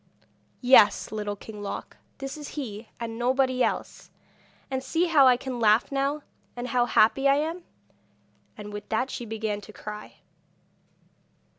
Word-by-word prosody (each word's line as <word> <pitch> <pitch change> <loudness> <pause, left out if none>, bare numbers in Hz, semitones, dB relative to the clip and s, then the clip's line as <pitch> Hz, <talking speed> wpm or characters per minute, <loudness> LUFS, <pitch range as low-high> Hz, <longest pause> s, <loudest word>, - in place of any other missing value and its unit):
'Yes, 235 -7 +5
Little 210 -1 -3
King 210 +1 -10
Loc, 200 - -6 0.2
this 270 +1 -5
is 300 -2 -8
he 220 -5 -6
and 230 0 -5
nobody 255 +1 +2
else! - - -3 0.6
And 260 0 -2
see 325 +6 +1
how 300 -6 +6
I 250 -1 +6
can 255 -1 -5
laugh 220 +3 +4
now, 280 +2 -1 0.3
and 245 +1 -5
how 245 -1 +2
happy 270 +6 +4
I 275 - +5
am!' 325 +4 -2 0.9
And 210 -1 -8
with 205 0 -7
that 250 +4 0
she 240 - -5
began 215 -1 -3
to 215 - -12
cry. 210 0 -9
245 Hz, 150 wpm, -26 LUFS, 215-270 Hz, 0.9 s, how